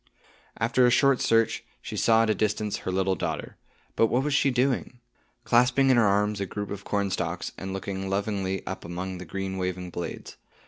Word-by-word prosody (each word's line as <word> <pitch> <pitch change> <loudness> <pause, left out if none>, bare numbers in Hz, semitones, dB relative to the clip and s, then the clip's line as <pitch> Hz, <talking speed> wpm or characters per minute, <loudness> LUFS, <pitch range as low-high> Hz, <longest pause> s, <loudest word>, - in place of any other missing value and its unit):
After 120 +2 +3
a - - +5
short 135 +1 +4
search, 115 0 +2 0.2
she - - -7
saw 115 0 +4
at 115 - 0
a - - +3
distance 105 0 -1
her - - -4
little 95 +1 +1
daughter. 95 - -4 0.4
But 115 - +4
what 125 +4 +1
was 150 0 0
she 140 - +3
doing? 125 -1 0 0.4
Clasping 125 +3 +4
in 130 - +4
her 115 -3 +5
arms 105 +1 +1
a 100 - -2
group 105 +2 -5
of 100 -1 -5
cornstalks, 100 -2 -2
and 95 0 -6
looking 95 0 -4
lovingly 95 -1 -2
up 95 - -5
among 90 +2 -5
the 90 - -7
green 95 +1 -4
waving 90 -1 -3
blades. 85 0 -6
100 Hz, 190 wpm, -26 LUFS, 95-120 Hz, 0.4 s, a